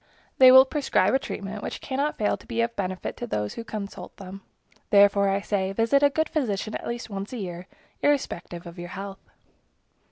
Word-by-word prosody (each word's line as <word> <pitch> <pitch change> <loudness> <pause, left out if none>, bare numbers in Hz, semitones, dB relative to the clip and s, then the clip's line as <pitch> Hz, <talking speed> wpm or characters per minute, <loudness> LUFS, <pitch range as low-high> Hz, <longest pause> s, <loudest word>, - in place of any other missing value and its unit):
They 260 -1 +10
will 260 +1 +9
prescribe 265 -8 +1
a 265 - +4
treatment, 205 -5 -6
which - - -5
cannot 280 +3 -2
fail 210 - +1
to - - -17
be 230 -1 -1
of 235 0 -1
benefit 185 -2 -3
to 240 - -5
those 105 - -2
who 230 - -6
consult 210 -3 -7
them. 195 0 -9 0.5
Therefore, 200 -1 +5
I 195 +1 0
say, 195 -2 -1
visit 230 +7 +3
a 285 - +6
good 315 +3 0
physician 215 -7 -2
at - - -5
least 235 -2 -5
once 195 0 -5
a - - -4
year, 180 -3 -6 0.3
irrespective 180 -12 -1
of 170 +1 -10
your 175 0 -7
health. 195 +1 -7
205 Hz, 195 wpm, -25 LUFS, 195-255 Hz, 0.5 s, They